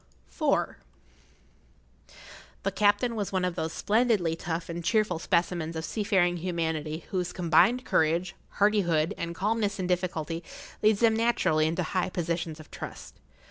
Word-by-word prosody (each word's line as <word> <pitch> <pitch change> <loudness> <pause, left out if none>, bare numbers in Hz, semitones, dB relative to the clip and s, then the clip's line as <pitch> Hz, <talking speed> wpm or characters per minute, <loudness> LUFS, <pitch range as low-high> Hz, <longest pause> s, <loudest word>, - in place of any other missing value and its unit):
[Pg - - -23 0.2
57] - - +2 1.5
IV. - - -19 0.5
The 195 - 0
captain 210 +4 +2
was 205 -3 -2
one 185 -1 0
of 180 - -1
those 160 -2 -3
splendidly 210 -7 +1
tough 165 0 -4
and 170 -1 -5
cheerful 210 -3 +1
specimens 170 -2 0
of 160 0 -3
seafaring 190 -3 +1
humanity 160 -2 -3
whose 180 -2 -1
combined 185 +9 +3
courage, 170 +3 +1 0.2
hardihood, 180 -7 +2
and 170 0 -4
calmness 205 +1 0
in 185 - -2
difficulty 175 -2 -2 0.4
leads 215 0 +3
them 225 -1 +5
naturally 220 -9 +2
into 170 +3 -1
high 185 +2 -1
positions 170 -2 -3
of 155 - -13
trust. - - -9
180 Hz, 145 wpm, -28 LUFS, 165-205 Hz, 1.5 s, them